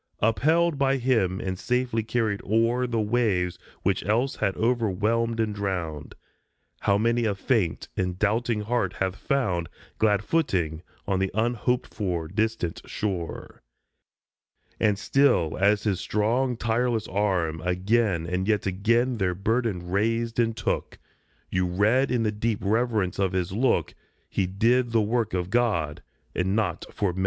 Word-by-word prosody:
Upheld 155 +8 +2
by 135 0 +3
him 115 -8 +1
and 95 -1 -4
safely 125 -1 0
carried 110 -2 -1
o'er 115 +4 +2
The 115 -2 -1
waves 105 -6 +1 0.2
which - - +1
else 115 +8 0
had 95 - 0
overwhelmed 115 0 +1
and 110 -2 0
drowned, 90 -7 -4 0.6
How 100 - +2
many 115 +2 +1
a 105 -2 0
faint 100 -4 0
and 90 -1 -1
doubting 110 +2 +1
heart 105 -4 -1
hath 95 -1 -2
found 100 - -1 0.3
Glad 105 -2 +3
footing 90 - 0 0.2
on 95 -2 0
the 95 0 +1
unhoped 120 +2 0
for, 90 -6 -2
distant 105 -2 -1
shore 95 -6 -4 1.2
1 110 - +4
And 100 - 0
still 110 - +2
as 100 +1 +3
his 100 -4 0
strong, 120 +6 0
tireless 115 -1 0
arm 90 -5 0
again 90 +1 +1
And 90 +2 -2
yet 105 -3 +1
again 115 +6 +1
their 90 -2 +1
burden 105 -2 -1
raised 115 +4 0
and 115 -1 +1
took, - - -2 0.5
You 90 0 +1
read 110 +9 +2
in 120 -2 +1
the 105 - +1
deep 110 +1 -1
reverence 105 -3 0
of 95 -1 +1
his 90 -2 -1
look 120 +7 +1 0.3
He 95 - -1
did 115 +6 +2
the 115 - +4
work 115 0 0
for 90 -1 -1
God 95 -7 0 0.3
and 95 +2 0
not 110 -1 -1
for 100 -4 -1
men. 95 - -6
105 Hz, 150 wpm, -26 LUFS, 95-115 Hz, 1.2 s, 1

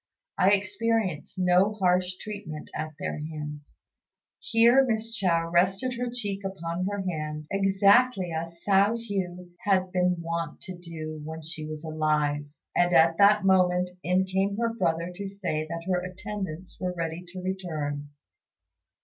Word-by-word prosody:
I 185 - +6
experience 205 -4 0
no 185 +3 +4
harsh 180 -2 +1
treatment 200 -8 -7
at 155 0 -4
their - - -3
hands." 150 -1 -7 0.6
Here 235 +4 +5
Miss 225 -2 -1
Chao 170 -5 +1
rested 195 +8 +2
her 245 0 -2
cheek 205 -5 -4
upon 185 -2 -3
her 205 -1 -2
hand, 155 -4 -3
exactly 195 +1 +4
as 165 +1 -5
Hsiao 200 +3 +4
hui 185 -5 -4
had 185 -2 +1
been 180 0 +2
wont 165 -1 -3
to 185 0 -7
do 160 -3 -7
when 160 +1 -7
she 155 0 -5
was 155 0 -6
alive; 150 -2 0 0.3
and 175 0 +3
at 165 0 +5
that 205 0 +6
moment 180 -1 +3
in 185 +1 +2
came 195 +2 0
her 230 0 0
brother 170 -5 0
to 200 +2 -5
say 180 -6 -3
that 165 +1 -5
her 180 -1 +1
attendants 190 -1 -6
were 180 -1 -2
ready 165 +1 -3
to 185 +1 -8
return. 155 -6 -3
180 Hz, 150 wpm, -27 LUFS, 165-200 Hz, 0.6 s, I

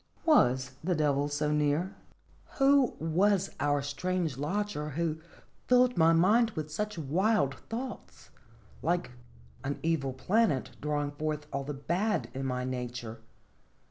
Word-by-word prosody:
Was 130 - +4
the 180 +1 +1
Devil 145 -2 +1
so 145 +1 -1
near? 150 +5 +1 0.6
Who 275 -2 +4
was 190 +4 +2
our 145 -1 +1
strange 165 +1 -2
lodger, 150 +2 -2
who 160 +1 -2 0.5
filled 250 0 +4
my 165 0 +5
mind 210 +8 +4
with 155 -1 -4
such 210 +4 -3
wild 165 +1 +1 0.2
thoughts, 245 +3 -7 0.5
like 175 -4 0 0.5
an 140 +1 -2
evil 155 -5 0
planet 140 - +1
drawing 145 -1 -1
forth 150 0 -3
all 140 0 -2
the 145 0 -4
bad 170 - -1
in 135 0 -3
my 125 -1 -2
nature? 120 -3 -5
155 Hz, 130 wpm, -30 LUFS, 140-195 Hz, 0.6 s, my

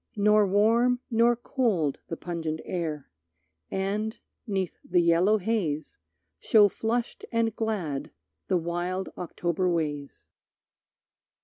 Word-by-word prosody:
Nor 210 0 +4
warm, 230 +5 +3
nor 235 +1 +4
cold 220 - 0
The 165 - -5
pungent 165 -2 -4
air, 155 - -4 0.6
and, 205 +3 -2 0.3
'neath 190 -4 -2
the 180 0 +2
yellow 170 +6 +4
haze, 180 -8 -2 0.4
Show 210 - +5
flushed 230 +4 -2
and 230 -2 +1
glad 190 -11 -2 0.4
the 185 - +2
wild, 175 +2 -2
October 175 +1 -1
ways. 150 -4 -3
190 Hz, 105 wpm, -27 LUFS, 170-220 Hz, 0.6 s, Show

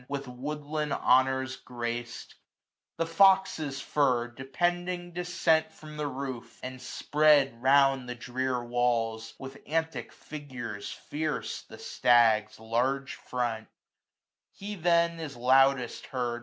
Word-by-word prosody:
With 140 -1 -4
woodland 150 +3 -4
honours 130 +1 +2
grac*d; 120 -1 -5 0.6
the 165 - 0
fox's 165 -5 +3
fur, 125 -5 +1
495 120 - -23
Depending 175 +6 -2
decent 170 -2 +1
from 155 -1 -12
the 150 -1 -2
roof; 130 -3 -6
and 130 0 -6
spread 145 -5 +3
Round 135 -1 +4
the 125 - -4
drear 125 0 -2
walls, 115 -2 -1
with 135 0 -9
antic 160 +1 -2
figures 130 -9 -7
fierce. 155 0 -4
The - - -13
stag's 115 -3 +3
large 125 +5 -1
front: 120 -3 -3 0.9
he 205 +1 -7
then 170 -2 +2
is 150 -6 -6
loudest 130 0 +3
heard. 120 -2 -2
135 Hz, 115 wpm, -29 LUFS, 120-155 Hz, 0.9 s, Round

